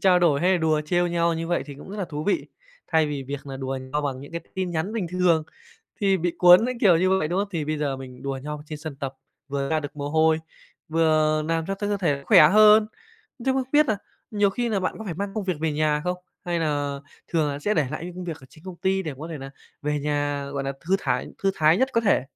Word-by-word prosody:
trao 185 -2 +5
đổi 155 -5 +3
hay 185 +2 +3
là 180 - +3
đùa 155 -2 +2
trêu 175 +3 +1
nhau 170 -1 +1
như 165 0 -3
vậy 175 +1 0
thì 145 - -8
cũng 145 +7 -11
rất 205 - -6
là 200 - -2
thú 150 -2 -5
vị. 260 +10 0 0.4
Thay 160 -1 +2
vì 145 -2 -3
việc 140 +1 -5
nà 135 -1 -6
đùa 135 0 -3
nhau 150 0 0
bằng 135 -3 -3
những 140 - -11
cái 170 - -3
tin 185 -1 -2
nhắn 170 +5 -2
bình 220 -6 -2
thường 180 -3 +3 0.6
thì 195 -2 +3
bị 175 -1 -1
cuốn 180 +5 +8
cái 255 - -2
kiểu 190 -7 +6
như 185 +3 +2
vậy, 155 - -1
đúng 175 +3 0
không? 200 +1 0
Thì 165 -5 -2
bây 155 0 -2
giờ 140 -3 -1
mình 130 -1 -10
đùa 135 -1 -3
nhau 150 +1 -5
trên 150 0 -6
sân 155 -2 -7
tập, 135 -1 -5 0.3
vừa 140 0 -2
ra 160 -1 +2
được 145 0 -8
mồ 145 0 -3
hôi, 160 +1 +3 0.5
vừa 155 -1 +2
làm 165 0 0
cho 195 - -1
cho 205 +1 -4
cơ 205 0 0
thể 165 -7 +1
cũng 140 - -12
khỏe 150 - +8
hơn, 215 +3 +7 0.6
chứ 265 - +3
không 265 0 +1
biết 300 +1 +5
nà 220 - +1 0.3
nhiều 205 -2 +2
khi 240 +4 -2
là 210 -4 0
bạn 185 - -1
có 220 - -7
phải 180 -5 -4
mang 200 +3 -4
công 215 -3 -2
việc 185 - 0
về 160 -1 0
nhà 150 0 +1
không? 180 0 -1 0.3
Hay 175 -1 -1
nà 145 -3 -1 0.3
thường 160 -3 +1
là 140 0 -3
sẽ 205 +9 0
để 155 -4 +2
lại - - -5
những 180 0 -7
công 180 0 -6
việc 165 -3 -4
ở 130 - -14
trên 155 - -19
công 185 -2 -8
ty 190 +2 0
để 155 -5 -4
mà 130 - -14
có 160 +3 -6
thể 160 -3 -6
nà 135 0 -8 0.3
về 150 0 0
nhà, 145 -1 -1
gọi 140 -1 -2
nà, 135 0 -2
thư 185 +4 +1
thải 125 -7 -1 0.2
thư 195 - +3
thái 155 +2 +4
nhất 260 +2 +3
có 230 - +3
thể? 200 - +3
160 Hz, 285 wpm, -24 LUFS, 145-185 Hz, 0.6 s, cuốn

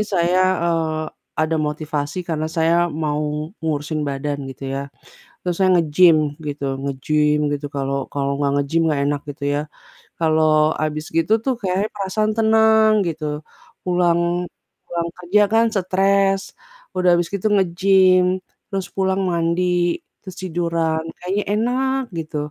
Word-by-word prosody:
saya, 185 -3 +1 0.2
eee, 160 -2 0 0.3
ada 155 +1 +1
motivasi 150 0 -3
karena 155 -1 -1
saya 170 +2 +3
mau 150 -1 -2 0.4
ngurusin 155 -1 -2
badan 140 +1 -3
gitu 135 +1 -9
ya, 135 - -2 0.6
terus 175 -1 -2
saya 190 -1 +3
nge-gym 165 +1 +5 0.3
gitu 145 -1 -4 0.2
nge-gym 150 +2 +1 0.2
gitu 145 0 -3
kalau 140 0 -2
kalau 140 -1 -1
nggak 140 -1 +1
nge-gym 160 +4 0
gak 145 -2 0
enak 145 0 -1
gitu 145 0 -8
ya, 145 - 0 0.6
kalau 155 -1 +3
abis 155 0 -2
gitu 165 +6 +2
tuh 265 - +2
kayak 195 +2 0
perasaan 210 +2 -1
tenang 220 0 +5 0.2
gitu, 160 -2 -4 0.6
pulang 175 0 +1 0.4
pulang 170 -1 -2
kerja 185 +4 +3
kan 225 +1 +5
stres, 195 +1 +2 0.6
udah 180 -1 +3
abis 175 -1 0
gitu 200 +1 -3
nge-gym, 185 0 +3 0.3
terus 195 -1 -2
pulang 190 0 +1
mandi, 175 +1 +1 0.2
terus 185 -2 -8
tiduran 165 -2 -1 0.2
kayaknya 195 +3 -1
enak 260 +4 0 0.2
gitu, 155 -1 -5
170 Hz, 135 wpm, -21 LUFS, 155-190 Hz, 0.6 s, nge-gym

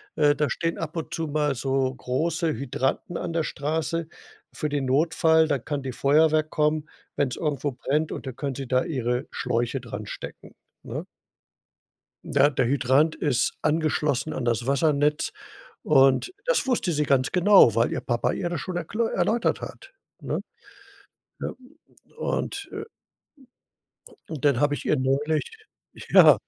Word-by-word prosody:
Äh, 145 -1 +4
da 150 -3 0
stehen 165 0 -2
ab 165 +1 -5
und 160 - -5
zu 165 -1 -2
mal 150 -1 0
so 130 +1 0
große 160 +6 -1
Hydranten 135 +5 -2
an 165 - -4
der 165 -1 +1
Straße 160 +3 -2 0.4
für 150 - -3
den 145 -2 -1
Notfall. 160 +3 +3
Dann 140 -5 -1
kann 145 -2 -3
die 130 - -3
Feuerwehr 155 +4 +3
kommen, 150 0 0 0.3
wenn's 135 -3 0
irgendwo 145 -3 -1
brennt, 150 +5 -1
und - - -6
da - - -2
können 135 0 -4
sie 135 -2 -5
da 130 +1 +2
ihre 125 -4 -2
Schläuche 120 +3 -1
dranstecken, 110 -4 -8 0.3
ne? - - -5 1.2
Ne, 145 - +3
der 130 - +1
Hydrant 135 +4 +3
ist 135 -5 +1
angeschlossen 155 -2 0
an 130 - -3
das 120 0 0
Wassernetz 145 +1 +2 0.5
und 135 - +4
das - - +1
wusste 235 -8 +1
sie 150 -1 +1
ganz 135 -2 +2
genau, 185 - +6
weil 115 +2 +2
ihr - - -2
Papa 120 -1 0
ihr 175 - -2
das 170 -5 -3
schon 180 +2 -4
erkl 175 +7 -3
erläutert 220 +6 0
hat, 390 - -9 0.3
ne? - - -2 1.0
Ja, - - -3 0.7
und, - - -3
äh - - -5 1.5
und 150 -3 -4
dann 140 -4 +4
habe 145 +1 +2
ich - - -5
ihr 150 - +2
neulich 145 - 0 0.5
ja, - - +9
145 Hz, 150 wpm, -25 LUFS, 130-160 Hz, 1.5 s, ja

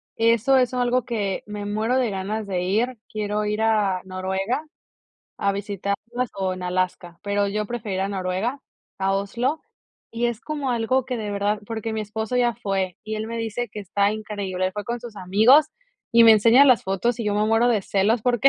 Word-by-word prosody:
eso 230 +4 +3
es 250 -1 +2
algo 250 0 +1
que, 210 -6 -2
me 210 -1 -5
muero 215 +5 0
de 250 -3 +1
ganas 200 +3 -3
de 185 -2 -1
ir, 225 +7 0
quiero 210 0 -2
ir 210 +1 -1
a 210 -4 +2
Noruega 190 +8 -2 0.7
a 200 - +1
visitarlas, 205 +5 -3
o 190 -1 -1
en 185 - -8
Alaska, 180 -1 -2
pero 205 0 0
yo 210 +1 -1
prefiero 220 -3 -4
ir - - -1
a 195 - -1
Noruega, 195 +7 -2 0.4
a 195 0 +1
Oslo. 240 +10 -1 0.5
Y 235 +1 -1
es 235 -1 -3
como 290 -2 -3
algo 245 +2 +1
que 250 -2 -3
de 210 -2 -4
verdad 205 +1 0
porque 225 0 -4
mi 220 - -2
esposo 220 +3 -3
ya 240 -1 +2
fue, 195 -5 -2
y 215 - -4
él 215 0 -3
me 230 +1 -5
dice 230 +1 -3
que 210 - -6
está 200 +1 +1
increíble, 205 -4 -3
él 185 - -3
fue 210 +1 -5
con 235 +2 -3
sus 235 -3 -10
amigos 220 +11 +5 0.5
y 230 0 +7
me 225 - +9
enseña 230 +5 +6
las 255 -4 +5
fotos, 225 +5 -1
y - - -2
yo 205 -1 0
me 210 +1 +2
muero 225 +2 +3
de 220 -5 +2
celos, 205 +4 +1
porque 245 +1 +4
215 Hz, 205 wpm, -23 LUFS, 200-240 Hz, 0.7 s, me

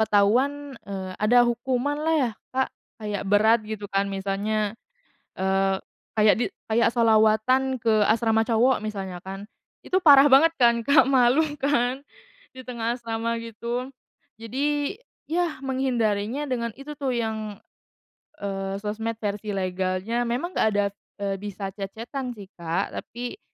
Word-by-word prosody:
ketahuan, 255 +8 +2 0.2
eee, 190 -2 -5
ada 240 +3 +5
hukumanlah 265 +6 0
ya 260 -6 +2 0.2
Kak 265 0 0 0.3
kayak 210 -2 -4
berat 220 +3 +5
gitu 215 -2 -5
kan 200 0 0
misalnya, 200 +2 -1 0.6
eee, 190 0 +1 0.3
kayak 215 -1 +5
di 240 - +1 0.3
kayak 230 +1 +3
sholawatan 230 +3 +3
ke 230 - +2 0.2
asrama 225 0 +2
cowok 245 +3 +3
misalnya 195 -4 -5
kan, 195 +4 -9 0.3
itu 370 - +1
parah 290 -5 +7
banget 320 +5 +6
kan 235 -4 +3
Kak 275 -2 +5
malu 255 +3 +5 0.2
kan, 270 0 0 0.5
di 260 - -9
tengah 235 -2 -2
asrama 230 -1 -3
gitu. 235 +3 -4 0.5
Jadi 285 - -1 0.3
ya 335 -2 -1
menghindarinya 255 -2 -1
dengan 240 -3 -2
itu 290 +2 -8
tuh 275 -2 -2
yang, 220 -3 -3 0.8
eee, 195 -1 -4
sosmed 220 +2 -3
versi 205 0 -3
legalnya 190 +5 -1
memang 250 +10 -2
nggak 275 - +2
ada, 205 0 +3 0.4
eee, 195 -1 -1
bisa 200 -1 -5
chat-chat-an 230 +6 -6
sih 200 -2 -12
Kak 170 +3 -2
tapi, 245 - -7
230 Hz, 135 wpm, -25 LUFS, 205-260 Hz, 0.8 s, parah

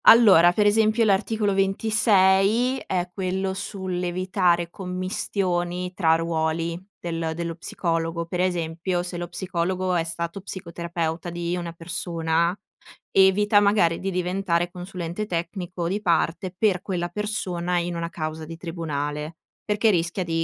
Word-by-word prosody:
Allora, 195 -7 +8
per 205 +4 +2
esempio 220 +2 +4
l'articolo 205 +1 +1
26 205 +4 +3
è 180 -1 0
quello 190 0 -1
sull'evitare 180 -2 -1
commistioni 180 -1 -2
tra 165 -3 +3
ruoli 165 0 -1 0.2
del 165 -1 -3
dello 170 0 -3
psicologo. 165 0 -2
Per 175 +2 -4
esempio, 175 0 -1
se 175 0 -5
lo 175 0 -4
psicologo 185 +1 -2
è 170 -2 +2
stato 170 +3 -4
psicoterapeuta 170 -2 -4
di 170 0 -2
una 175 -1 -4
persona, 170 0 -1 0.6
evita 205 +2 +5
magari 200 -5 +3
di 195 - -2
diventare 180 -1 0
consulente 180 +2 -5
tecnico 175 0 -3
di 200 +4 -1
parte 175 +1 +1
per 190 -3 +2
quella 175 -3 -2
persona, 180 -3 -2
in 175 0 -1
una 170 0 -3
causa 155 -1 -4
di 165 +1 -8
tribunale, 155 -2 -4 0.3
perché 210 +1 +2
rischia 175 +1 0
di, 165 -1 -1
175 Hz, 130 wpm, -24 LUFS, 170-190 Hz, 0.6 s, Allora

